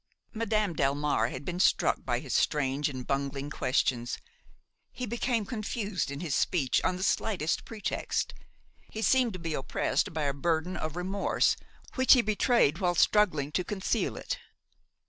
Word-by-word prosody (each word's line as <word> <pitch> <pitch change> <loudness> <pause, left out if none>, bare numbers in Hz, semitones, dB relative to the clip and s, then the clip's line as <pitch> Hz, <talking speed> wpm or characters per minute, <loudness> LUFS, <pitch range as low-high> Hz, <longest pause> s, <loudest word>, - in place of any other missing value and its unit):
Madame 215 -5 0
Delmare 140 -5 +1
had 130 +3 -7
been 180 0 -3
struck - - +3
by - - 0
his - - -5
strange 145 0 +1
and 130 -3 -6
bungling 140 +1 -2
questions. 125 -3 0 0.7
He 250 - -4
became 235 -1 -1
confused 215 - -3
in 140 +2 -5
his 165 -5 -2
speech 140 -5 +1
on 185 - +1
the 185 - -4
slightest 185 -7 0
pretext; 215 -3 -2 0.6
he 220 - -5
seemed 250 -3 +3
to - - -5
be 165 -2 -4
oppressed 135 - 0
by 160 -2 -2
a 140 -1 +1
burden 165 +5 -1
of 155 0 -4
remorse 190 +3 +1 0.4
which 260 -1 +6
he 250 -3 +5
betrayed 210 - +2
while 180 -3 +1
struggling 165 -8 +3
to 180 - 0
conceal 190 +1 -1
it. - - -4
175 Hz, 155 wpm, -29 LUFS, 145-215 Hz, 0.7 s, which